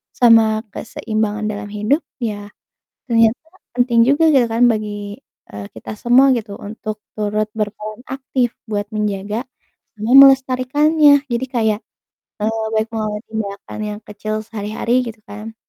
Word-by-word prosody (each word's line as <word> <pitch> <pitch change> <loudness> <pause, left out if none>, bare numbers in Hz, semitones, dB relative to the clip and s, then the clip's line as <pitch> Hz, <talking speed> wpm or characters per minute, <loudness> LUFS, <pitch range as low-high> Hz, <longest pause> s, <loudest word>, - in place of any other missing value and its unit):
sama 225 -2 +5
keseimbangan 215 -1 -3
dalam 205 0 -6
hidup 215 +9 +1 0.2
ya 205 -2 -4 0.6
ternyata 230 0 +3 0.3
penting 245 -2 +3
juga 315 +3 +4
gitu 250 -3 +5
kan 230 +2 +2
bagi, 205 -1 -5 0.3
eee, 100 0 -7
kita 110 - -8
semua 255 +4 +5
gitu 210 -3 -5
untuk 215 0 -6 0.2
turut 210 0 -1
berperan 215 +1 -4
aktif 260 -2 -1 0.2
buat 205 0 -1
menjaga 210 +2 -2 0.6
sama 220 +3 -1
melestarikannya. 275 +3 +5
Jadi 240 +2 -1
kayak, 220 -4 0 0.6
eee, 220 +1 -1
baik 220 +1 +1
mengambil 215 -1 -3
tindakan 205 -2 -5
yang 210 0 -5
kecil 215 +1 -5
sehari-hari 225 +3 -1
gitu 225 -1 -8
kan, 215 +2 -8
220 Hz, 130 wpm, -19 LUFS, 210-245 Hz, 0.6 s, sama